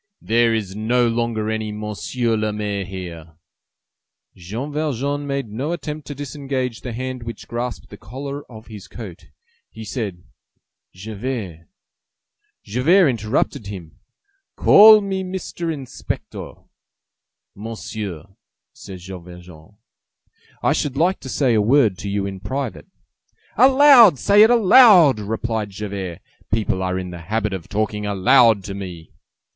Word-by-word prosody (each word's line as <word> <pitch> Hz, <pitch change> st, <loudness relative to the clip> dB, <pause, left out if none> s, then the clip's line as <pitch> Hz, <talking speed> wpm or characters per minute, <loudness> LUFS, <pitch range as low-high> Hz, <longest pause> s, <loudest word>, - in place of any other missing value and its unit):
"There 115 Hz, +1 st, +2 dB
is 105 Hz, -4 st, -3 dB
no 120 Hz, +3 st, +1 dB
longer 115 Hz, -2 st, -1 dB
any 110 Hz, -1 st, -3 dB
Monsieur 105 Hz, +3 st, -2 dB
le 110 Hz, 0 st, -1 dB
Maire 105 Hz, -2 st, -3 dB
here!" 85 Hz, -4 st, -9 dB, 1.0 s
Jean 110 Hz, -, -6 dB
Valjean 145 Hz, -1 st, -2 dB
made 140 Hz, -4 st, -3 dB
no 135 Hz, +10 st, -3 dB
attempt 150 Hz, -4 st, -6 dB
to 145 Hz, -, -6 dB
disengage 135 Hz, -3 st, -4 dB
the 125 Hz, -, -6 dB
hand 130 Hz, +2 st, -5 dB
which 115 Hz, 0 st, -8 dB
grasped 120 Hz, +1 st, -5 dB
the 105 Hz, -, -10 dB
collar 140 Hz, +7 st, -7 dB
of 110 Hz, 0 st, -12 dB
his 105 Hz, -4 st, -11 dB
coat. 100 Hz, -8 st, -10 dB, 0.4 s
He 110 Hz, -, -10 dB
said:— 100 Hz, -6 st, -5 dB, 0.7 s
"Javert—" 100 Hz, -4 st, -6 dB, 1.0 s
Javert 150 Hz, -, +3 dB
interrupted 115 Hz, 0 st, -2 dB
him: 90 Hz, -6 st, -9 dB, 0.6 s
"Call 215 Hz, +1 st, +8 dB
me 195 Hz, -1 st, -3 dB
Mr. 180 Hz, -2 st, -5 dB
Inspector." 135 Hz, -5 st, -6 dB, 1.0 s
"Monsieur," 105 Hz, -5 st, -7 dB, 0.5 s
said 95 Hz, -, -10 dB
Jean 90 Hz, 0 st, -10 dB
Valjean, 90 Hz, +1 st, -14 dB, 0.9 s
"I -, -, +3 dB
should 140 Hz, -2 st, -2 dB
like 175 Hz, +5 st, +1 dB
to 130 Hz, -, -9 dB
say 130 Hz, -2 st, +1 dB
a 110 Hz, -, +3 dB
word 110 Hz, -4 st, +3 dB
to 100 Hz, -, -5 dB
you 100 Hz, 0 st, -1 dB
in 95 Hz, -1 st, -6 dB
private." 110 Hz, -, -5 dB, 0.7 s
"Aloud! 260 Hz, -, +7 dB
Say 200 Hz, -, +4 dB
it 220 Hz, -, +7 dB
aloud!" 210 Hz, -, +6 dB
replied 110 Hz, 0 st, -3 dB
Javert; 95 Hz, -4 st, -6 dB, 0.3 s
"people 105 Hz, -3 st, 0 dB
are 95 Hz, 0 st, -1 dB
in 90 Hz, -1 st, -5 dB
the 85 Hz, -1 st, -9 dB
habit 105 Hz, +3 st, -2 dB
of 90 Hz, -4 st, -7 dB
talking 105 Hz, 0 st, -2 dB
aloud 105 Hz, +2 st, +4 dB
to 100 Hz, -, -6 dB
me." 90 Hz, -5 st, -8 dB
110 Hz, 135 wpm, -21 LUFS, 100-140 Hz, 1.0 s, Call